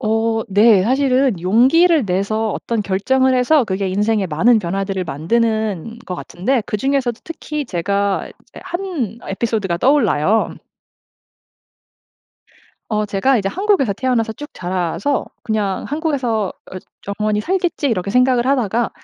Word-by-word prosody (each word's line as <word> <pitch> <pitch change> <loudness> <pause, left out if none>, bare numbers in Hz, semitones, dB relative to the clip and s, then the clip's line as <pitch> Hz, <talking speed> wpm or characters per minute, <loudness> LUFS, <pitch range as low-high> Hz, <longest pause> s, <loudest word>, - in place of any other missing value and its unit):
어 225 -1 0
네. 205 0 +5
사실은 260 -4 +2
용기를 265 - +4
내서 200 +4 -1
어떤 230 -3 -2
결정을 260 +7 +1
해서 255 +2 +3
그게 190 -1 -2
인생의 210 +1 0
많은 220 +10 +3
변화들을 195 +1 -2
만드는 220 +5 -1
것 180 - -4
같은데 235 +9 -1
그중에서도 250 +1 -1
특히 300 -2 -5
제가 200 +1 -1
이제 - - -16
1 340 - -4
에피소드가 200 -4 -1
떠올라요. 220 - +2 2.4
어 215 -1 0
제가 210 +6 +1
이제 195 -2 -1
한국에서 380 - +1
태어나서 230 0 -1
쭉 295 +6 -9
자라서 185 - -2 0.2
'그냥 210 -3 -2
한국에서 270 -8 -1 0.3
어 - - -6 0.4
영원히 210 0 0
살겠지.' 355 - -1
이렇게 200 -6 -1
생각을 250 +1 +3
하다가 240 -4 +1
225 Hz, 295 characters per minute, -18 LUFS, 195-265 Hz, 2.4 s, 네